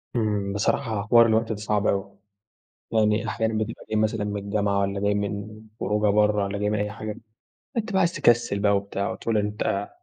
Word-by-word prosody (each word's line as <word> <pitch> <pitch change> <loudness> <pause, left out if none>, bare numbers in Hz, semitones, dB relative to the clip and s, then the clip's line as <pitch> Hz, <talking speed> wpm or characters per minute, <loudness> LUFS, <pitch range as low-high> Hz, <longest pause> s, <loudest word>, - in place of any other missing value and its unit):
إمم، 105 -3 0
بصراحة 105 +2 0
حوار 115 +1 +7
الوقت 110 0 +2
ده 110 - -1
صعب 105 0 0
أوي. 100 0 -1 0.7
يعني 110 0 +2
أحيانًا 110 0 -1
بتبقى 110 +1 -3
جاي - - 0
مثلًا 110 -1 0
من 105 -1 -3
الجامعة 100 -1 0
والّا 100 0 -1
جاي 105 0 +1
من 105 +1 -4 0.2
خروجة 105 +1 +1
برّه 105 -1 +3
والّا 100 +1 -3
جاي 105 0 0
من 105 -1 0
أي 105 0 -2
حاجة، 110 0 -6 0.6
أنت 225 0 -1
بقى 190 - +2
عايز 175 -1 +2
تكسِّل 120 - +2
بقى 100 0 +3
وبتاع 100 0 -3
وتقول 115 -2 -1
أنت 105 -1 -1
105 Hz, 190 wpm, -25 LUFS, 100-110 Hz, 0.7 s, حوار